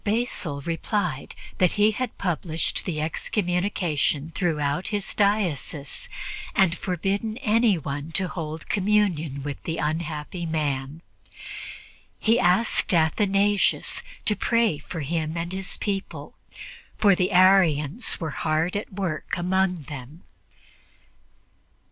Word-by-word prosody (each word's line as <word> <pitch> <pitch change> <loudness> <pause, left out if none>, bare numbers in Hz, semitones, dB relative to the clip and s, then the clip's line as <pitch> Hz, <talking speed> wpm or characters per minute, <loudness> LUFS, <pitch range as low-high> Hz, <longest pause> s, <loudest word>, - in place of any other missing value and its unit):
Basil 205 -9 -1
replied 165 -1 -2 0.2
that 180 -2 +4
he 210 +1 +4
had 245 +1 -4
published 165 -3 0
the 165 -5 -2
excommunication 175 -2 0
throughout 150 -1 0
his 205 -2 -2
diocese 180 -8 0 0.5
and 185 -3 +4
forbidden 195 +5 -2
anyone 180 - +1
to 190 +1 +1
hold 160 -3 -5
communion 185 -9 +1
with 145 -1 -5
the 165 - -3
unhappy 155 +2 -3
man. 150 -1 -2 1.1
He 225 +2 +3
asked 180 +1 +2
Athanasius 195 +5 +2 0.2
to 210 - +3
pray 225 -6 +2
for 160 +2 -6
him 160 +2 -2
and 170 +2 -3
his 190 -1 -3
people, 200 -2 -4 0.6
for 205 -2 +5
the 185 +1 +1
Arians 185 - +4
were 160 -3 -3
hard 155 +5 0
at 205 - -3
work 185 -5 -3
among 180 -1 +1
them. 145 +3 -9
175 Hz, 110 wpm, -25 LUFS, 155-200 Hz, 1.1 s, for